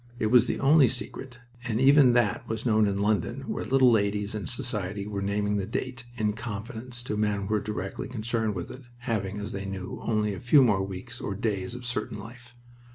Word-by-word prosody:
It 110 -2 0
was 125 -1 +6
the - - -1
only 140 0 +6
secret, 125 +2 -6 0.3
and 115 -2 -1
even 135 -1 +6
that 120 -4 +1
was 110 +1 -3
known 110 -3 +4
in 100 -1 0
London, 110 +5 0
where - - -4
little 130 -1 +5
ladies 105 -1 +1
in 105 -2 -4
society 105 -6 -2
were 100 -1 -4
naming 105 +1 0
the 95 -1 -2
date, 125 -2 -4
"in 105 -2 +1
confidence," 115 +3 -6
to 110 - -3
men 105 -1 0
who - - -4
were 105 +1 +1
directly 100 -3 -4
concerned 110 -3 -2
with 90 - -5
it 130 - -10 0.2
having, 105 -5 -2
as 105 0 -5
they 100 0 -5
knew, 95 -1 -5
only 105 -2 0
a - - -6
few 130 +3 +6
more 105 -6 +3
weeks, 100 +6 -7
or 100 - -3
days, 105 +2 -2
of 125 0 -8
certain 110 -2 -3
life. 120 +3 -12
110 Hz, 210 wpm, -27 LUFS, 100-120 Hz, 0.3 s, was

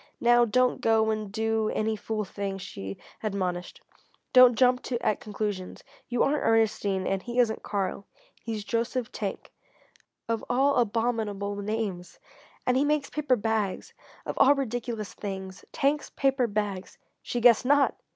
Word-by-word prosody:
"Now 240 0 +5
don't 250 +2 +2
go 220 -1 +3
and 215 -2 -3
do 220 0 0
any 220 0 0
fool 215 0 -3
thing," 195 0 -4
she 95 - -7 0.2
admonished. 185 -4 -3 0.5
"Don't 255 -2 +8
jump 250 +2 +3 0.2
at 215 - 0
conclusions. 205 -3 -4 0.3
You 245 -1 +2
aren't 295 +2 +1
Ernestine, 205 -4 +1
and 195 0 -1
he 240 +3 -6
isn't 235 -3 +2
Karl. 200 -1 -3 0.3
He's 220 -3 -4
Joseph 235 +2 -2
Tank 200 -2 -5 0.8
of 230 -1 -1
all 270 +3 +3
abominable 220 -3 0
names! 200 -4 -4 0.5
And 250 0 +2
he 270 - +3
makes 295 -1 0
paper 295 -4 +1
bags 215 -3 -2 0.3
of - - -4
all 285 +2 +7
ridiculous 240 -5 -3
things! 190 -2 -6
Tank's 290 +2 0
Paper 270 -3 +1
Bags!" 205 -3 -3 0.2
she 240 - -3
guessed 240 +1 +5
_not! 285 0 +4
220 Hz, 140 wpm, -27 LUFS, 200-245 Hz, 0.8 s, Don't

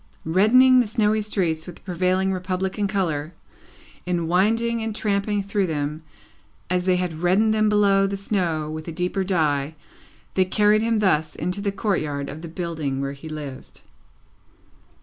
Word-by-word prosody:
Reddening 245 +10 +5
the 245 - +2
snowy 215 -1 +1
streets 175 -6 -1
with 175 - -8
the - - -18
prevailing 185 +1 0
Republican 190 +2 -2
colour, 170 -6 -2 0.7
in 175 -2 -1
winding 225 +6 +2
and 220 -1 -3
tramping 205 -1 0
through 200 -1 0
them, 150 0 -3 0.7
as 180 0 +1
they 185 - +4
had 180 -3 -2
reddened 195 +6 +3
them 215 0 +2
below 200 -2 +3
the 200 0 -3
snow 175 -6 -1
with 155 +1 -6
a - - -4
deeper 180 +3 -1
dye, 155 -5 0 0.6
they 190 - +3
carried 210 +3 +3
him 225 0 +1
thus 160 -7 +1
into 180 +5 -3
the 200 0 -1
courtyard 155 -9 -2
of 155 - -8
the 170 - -7
building 160 -5 -3
where 140 0 -3
he 140 +3 -10
lived. 145 -4 -8
185 Hz, 160 wpm, -23 LUFS, 160-205 Hz, 0.7 s, Reddening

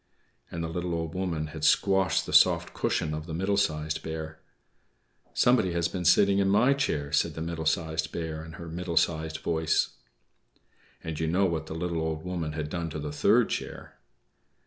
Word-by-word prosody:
And 85 - -4
the - - -2
little 85 +1 -3
Old 80 -1 -3
Woman 90 -4 -2
had 80 -1 -7
squashed 95 +3 +3
the - - -6
soft - - +5
cushion 75 - -1
of 75 +2 -5
the 80 - -4
Middle 95 +4 0
Sized 75 -5 0
Bear. 80 0 -6 1.0
"=Somebody 125 -8 +3
has 85 0 +1
been 90 0 -5
sitting 100 +2 +5
in 95 -1 +2
my 125 +7 +4
chair!=" 75 - -1
said 75 +1 +1
the - - -5
Middle 80 -1 -3
Sized 80 -1 0
Bear, 80 -1 -4
in 80 0 -10
her 85 0 -9
middle 85 +1 -4
sized 80 -2 +1
voice. 80 -1 +1 1.1
And 80 -2 -5
you 80 - 0
know 95 +4 +2
what 80 -3 -2
the 80 - -6
little 85 -1 -2
Old 80 0 -3
Woman 85 -4 -3
had 75 -1 -3
done 85 +1 -3
to 80 - -6
the 75 0 -4
third 75 - +3
chair. - - -6
80 Hz, 190 wpm, -28 LUFS, 80-90 Hz, 1.1 s, soft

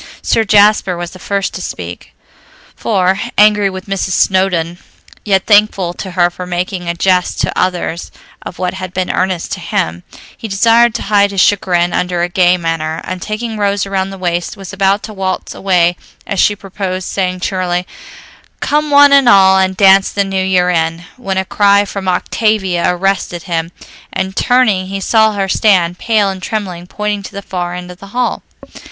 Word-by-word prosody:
Sir 225 - +2
Jasper 205 -3 +3
was 175 0 -5
the 185 - -13
first 200 +1 -2
to - - -6
speak, - - -7 0.6
for, 190 -2 0 0.2
angry 210 -1 +4
with 190 0 -8
Mrs. 195 -1 -2
Snowdon, 180 -3 +1 0.4
yet 195 -2 +1
thankful 205 -4 +3
to 190 - -7
her 175 0 +3
for 180 +1 -8
making 175 0 -3
a 170 - -2
jest 180 0 +1
to - - -1
others 175 -2 -2 0.3
of - - -9
what 180 -1 -2
had 185 -1 -7
been 185 -1 -1
earnest 185 -2 -2
to - - -3
him, 85 +1 -2 0.3
he 225 - -7
desired 230 +3 +3
to - - -3
hide 200 -1 +3
his 200 -1 -3
chagrin 175 -4 +2
under 180 -1 -1
a 175 - -1
gay 180 0 +3
manner; 165 -2 -3
and 185 -1 -6
taking 220 +2 -4
Rose 200 -1 0
around 195 -1 -2
the 195 - -8
waist 175 +1 -3
was 195 -1 -9
about 195 +1 +1
to 215 - -7
waltz 190 -2 -3
away 175 -2 +1 0.3
as 195 - -3
she 205 - +3
proposed, 190 -2 -5
saying 185 -2 -2
cheerily, 180 -1 -2 0.7
"'Come 300 +1 0
one 285 0 +6
and 275 -3 +6
all, 190 -3 +6
and 190 0 0
dance 195 -1 +5
the 200 - 0
new 195 -1 -2
year 180 -1 +2
in,'" 165 0 -1
when 195 -7 -4
a 190 - 0
cry 200 +1 +3
from 195 -1 -6
Octavia 190 -2 0
arrested 180 -1 -1
him, 165 -2 -3 0.4
and 190 0 -3
turning 220 -7 +2
he 195 +1 -4
saw 220 +2 +3
her 195 -1 -1
stand, 180 -3 +2
pale 220 -3 +1
and 190 -1 -8
trembling, 185 -4 -4
pointing 210 +1 -3
to 195 - -10
the 200 0 -7
far 175 -2 -4
end 180 0 -7
of 180 - -13
the 200 - -11
hall. 250 - 0
190 Hz, 185 wpm, -14 LUFS, 180-200 Hz, 0.7 s, one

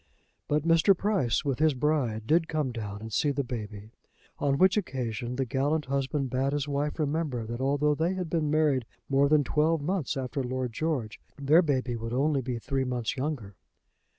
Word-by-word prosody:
But 150 0 +1
Mr. 165 +3 +4
Price, 185 - +1
with 135 -2 -1
his 155 -2 +3
bride, 125 -6 0
did 160 +6 +3
come 150 -5 -1
down 105 -3 -6
and 110 -1 -8
see 150 - +2
the 140 0 0
baby; 110 -4 -7 0.5
on 140 -1 +1
which 185 +3 +5
occasion 125 - -3
the 135 +1 0
gallant 145 +5 0
husband 135 0 -1
bade 135 +2 0
his 145 -1 -1
wife 145 +1 -1
remember 150 -6 -1
that 120 +3 -5
although 145 +2 +2
they 165 +5 0
had 180 -2 -3
been 155 -2 0
married 150 -5 +2 0.2
more 140 +1 +3
than 150 -1 +4
twelve 155 +3 +2
months 155 -2 -2
after 130 +1 -2
Lord 125 -1 -3
George, 135 -6 -2 0.2
their 150 +5 +5
baby 130 -6 0
would 115 0 -5
only 140 +2 +2
be 125 -1 -3
three 135 +3 -1
months 125 -2 -2
younger. 130 -7 -3
140 Hz, 185 wpm, -28 LUFS, 125-155 Hz, 0.5 s, which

